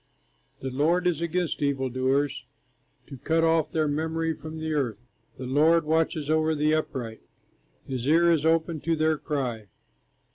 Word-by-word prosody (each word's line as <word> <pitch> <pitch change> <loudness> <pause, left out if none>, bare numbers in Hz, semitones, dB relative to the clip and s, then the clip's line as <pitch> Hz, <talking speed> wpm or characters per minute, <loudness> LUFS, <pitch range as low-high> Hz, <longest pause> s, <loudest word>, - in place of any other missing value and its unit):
The 130 - -4
Lord 165 +7 +1
is 170 -3 +1
against 170 -1 -1
evil 140 -2 0
doers, 130 +1 0 0.6
To 135 - -10
cut 165 +4 +1
off 165 -1 +2
their 155 -1 0
memory 160 +2 -1
from 160 +1 -9
the 160 0 -3
earth. 125 -8 -1 0.4
The 130 - -6
Lord 155 +5 +3
watches 160 -1 0
over 155 0 +2
the 150 +1 +2
upright, 125 -7 -3 0.6
His 130 -1 -4
ear 170 +3 +5
is 160 -3 +2
open 160 0 +1
to 165 +2 0
their 155 -1 +1
cry. 125 -8 -3
155 Hz, 155 wpm, -26 LUFS, 135-160 Hz, 0.6 s, ear